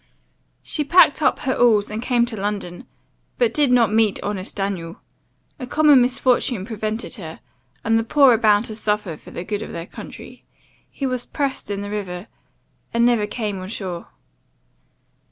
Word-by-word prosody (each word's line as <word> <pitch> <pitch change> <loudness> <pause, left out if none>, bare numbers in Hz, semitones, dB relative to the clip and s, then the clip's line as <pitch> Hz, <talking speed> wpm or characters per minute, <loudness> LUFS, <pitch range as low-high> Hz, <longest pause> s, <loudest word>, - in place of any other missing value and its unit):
"She 300 - -2
packed 315 0 +5
up - - +2
her 260 - 0
alls, 215 -5 +3
and 215 +1 -3
came 240 -1 +2
to 235 -2 -4
London 200 -4 -4 0.5
but 480 -2 +2
did 290 -4 +2
not 235 -4 +4
meet 220 -2 +3
honest 200 -2 -3
Daniel. 190 -4 -4 0.6
A 255 - -6
common 295 -2 +5
misfortune 245 -4 +1
prevented 220 0 -4
her, 160 -5 -8 0.4
and 225 0 +3
the - - -1
poor 275 +3 +5
are - - +3
bound 210 -1 +4
to 215 - -6
suffer 210 -5 -2
for - - -15
the 170 - -6
good 205 +2 -3
of - - -7
their 170 0 -5
country - - -11 0.5
he 275 - -5
was 255 -2 -2
pressed 280 -6 -3
in 200 -1 -3
the 205 0 -6
river 190 -3 -5 0.7
and 235 0 +2
never 235 -4 +2
came 210 -3 -3
on 185 - -7
shore. 185 -4 -6
215 Hz, 170 wpm, -21 LUFS, 200-250 Hz, 0.7 s, packed